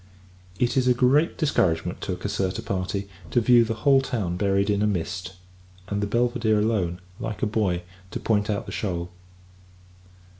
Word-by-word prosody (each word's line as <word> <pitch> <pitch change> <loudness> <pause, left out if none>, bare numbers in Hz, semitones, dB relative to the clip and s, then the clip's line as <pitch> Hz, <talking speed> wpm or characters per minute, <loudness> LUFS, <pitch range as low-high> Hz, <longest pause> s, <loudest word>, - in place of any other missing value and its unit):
It 120 +6 +1
is 130 -1 +3
a 125 - +5
great 135 +7 +3
discouragement 90 - +1
to 95 - -2
a - - -2
Caserta 95 -1 -2
party, 95 +1 -2 0.2
to 120 - +3
view 120 +1 +6
the 115 0 -2
whole 135 -1 +6
town 105 -9 -2
buried 100 +1 +1
in 100 0 +1
a 105 - +3
mist; 95 -1 -3 0.6
and 100 0 -1
the 105 - 0
Belvidere 120 -1 +1
alone, 100 -5 0 0.2
like 110 -5 -4
a - - +5
buoy, 100 -5 0 0.3
to - - -5
point 105 -1 +1
out 105 0 -1
the 100 - -7
shoal. 90 -4 -3
105 Hz, 175 wpm, -25 LUFS, 95-120 Hz, 0.6 s, view